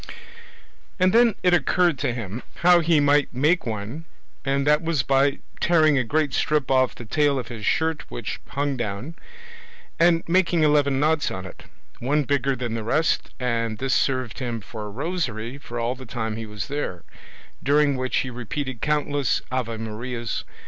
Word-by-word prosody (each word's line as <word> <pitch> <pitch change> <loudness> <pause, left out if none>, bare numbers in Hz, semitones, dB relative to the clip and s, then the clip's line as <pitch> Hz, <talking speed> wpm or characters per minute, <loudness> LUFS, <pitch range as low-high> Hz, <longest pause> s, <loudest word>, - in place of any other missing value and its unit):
And 185 0 +4
then 235 -2 +5
it 180 -1 +4
occurred 175 -3 +2
to 135 -3 0
him 115 -1 -5 0.2
how 175 -1 +8
he 165 -2 +3
might 145 0 +3
make 150 +5 +1
one, 110 +9 -5 0.4
and 140 0 0
that 150 +1 +4
was 165 -5 0
by 135 +1 +2 0.2
tearing 155 -3 +4
a - - +1
great 145 +3 0
strip 150 -4 +1
off 130 -1 +3
the 120 - -9
tail 145 +4 +2
of 125 - -4
his 110 -4 -5
shirt 160 -1 0
which - - -5
hung 140 0 -1
down, 120 +6 -4 0.9
and 170 0 +4
making 170 -2 +3
eleven 145 -3 +3
knots 155 +1 +2
on 95 0 -6
it, 95 - -11 0.3
one 145 +5 +1
bigger 140 -1 +1
than 120 -2 -4
the 115 -1 -3
rest, 150 +8 +1
and 115 -3 -1
this 135 +2 -1
served 130 -5 0
him 120 -3 -3
for 105 0 -8
a - - -7
rosary 130 - -3
all 120 0 -1
the 130 -1 -11
time 110 -2 -3
he 110 0 -6
was 105 -2 -5
there, 140 - -4 0.6
during 145 0 +3
which 130 0 -1
he 130 - -5
repeated 125 +1 -5
countless 145 -3 0
ave 120 -3 -2
marias. 115 +2 -4
135 Hz, 170 wpm, -24 LUFS, 115-150 Hz, 0.9 s, how